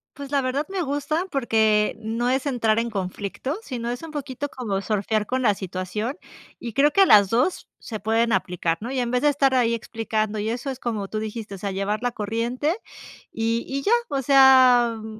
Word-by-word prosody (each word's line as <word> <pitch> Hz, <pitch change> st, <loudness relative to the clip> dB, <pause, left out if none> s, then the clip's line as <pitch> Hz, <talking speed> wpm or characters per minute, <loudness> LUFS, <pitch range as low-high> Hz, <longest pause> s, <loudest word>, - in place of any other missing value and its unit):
Pues, 280 Hz, -1 st, -8 dB
la 280 Hz, -1 st, +1 dB
verdad 265 Hz, +3 st, -1 dB
me 385 Hz, -1 st, -3 dB
gusta, 305 Hz, +3 st, -1 dB
porque 220 Hz, -5 st, +2 dB
no 230 Hz, +2 st, -1 dB
es 265 Hz, +2 st, 0 dB
entrar 230 Hz, -5 st, +1 dB
en 235 Hz, +1 st, -1 dB
conflicto, 200 Hz, -, -4 dB
sino 235 Hz, -, -4 dB
es 245 Hz, 0 st, -4 dB
un 325 Hz, -, -8 dB
poquito 285 Hz, -1 st, -5 dB
como 205 Hz, -7 st, -3 dB
surfear 210 Hz, +1 st, -1 dB
con 260 Hz, +4 st, -1 dB
la 215 Hz, -5 st, +3 dB
situación 195 Hz, -, -4 dB, 0.4 s
y 235 Hz, -3 st, -6 dB
creo 290 Hz, +4 st, +4 dB
que 395 Hz, -, +4 dB
a -, -, +8 dB
las 205 Hz, -, +6 dB
2 250 Hz, -, 0 dB
se 215 Hz, -3 st, -7 dB
pueden 225 Hz, +2 st, +1 dB
aplicar, 175 Hz, -3 st, 0 dB
¿no? 235 Hz, +4 st, -5 dB
Y 265 Hz, -, -1 dB
en 240 Hz, -1 st, -1 dB
vez 250 Hz, 0 st, 0 dB
de 295 Hz, -, +4 dB
estar 275 Hz, -2 st, +2 dB
ahí 235 Hz, -2 st, +3 dB
explicando, 220 Hz, -2 st, -2 dB
y 210 Hz, +2 st, -2 dB
eso 245 Hz, +4 st, -3 dB
es 260 Hz, -2 st, -5 dB
como 220 Hz, -6 st, -3 dB
tú 215 Hz, -, -4 dB
dijiste, 215 Hz, -1 st, -6 dB
o -, -, -9 dB
sea, 200 Hz, +1 st, -4 dB
llevar 200 Hz, +3 st, -2 dB
la 245 Hz, -, 0 dB
corriente 235 Hz, -, -2 dB, 0.5 s
y 230 Hz, +1 st, -1 dB
y 275 Hz, +1 st, -3 dB
ya, 420 Hz, -, +1 dB, 0.2 s
o 275 Hz, -1 st, -1 dB
sea, 260 Hz, -3 st, +6 dB
mm, 220 Hz, 0 st, -9 dB
235 Hz, 215 wpm, -23 LUFS, 215-265 Hz, 0.5 s, a